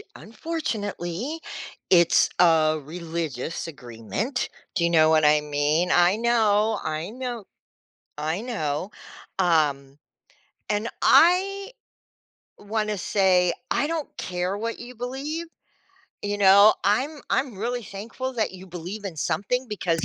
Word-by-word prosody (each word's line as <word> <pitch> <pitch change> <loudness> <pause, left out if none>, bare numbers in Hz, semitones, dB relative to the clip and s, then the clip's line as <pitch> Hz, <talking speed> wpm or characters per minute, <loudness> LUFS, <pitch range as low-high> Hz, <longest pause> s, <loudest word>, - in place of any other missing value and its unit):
unfortunately, 230 - -4 0.5
it's 170 -2 +5
a 155 -3 +4
religious 165 -1 -4
agreement. 145 - -4 0.3
Do 180 - +1
you - - +2
know 160 -2 +5
what 155 -1 +4
I 150 0 +5
mean? 150 +4 0
I 175 +2 +5
know, 220 -2 +2
I 155 +3 -3
know 240 -3 -6 0.7
I 160 +6 -2
know, 185 - -3 0.5
um, 145 -6 +1 0.7
and 210 +2 -1
I, 390 +5 +4 0.9
wanna 210 0 -2
say, 180 -3 +3 0.2
"I 290 - +1
don't 320 -2 -3
care 180 +2 -2
what 230 +2 -4
you 245 +1 -9
believe." 275 +7 -4 0.8
You 205 0 -2
know, 200 +2 +7
I'm 270 +9 +1
I'm 260 -6 0
really 240 +2 -3
thankful 230 +7 -6
that 220 -2 0
you 190 0 -11
believe 180 +4 -7
in 190 -4 -5
something 250 - -1
because 175 -6 -1
200 Hz, 120 wpm, -25 LUFS, 165-235 Hz, 0.9 s, know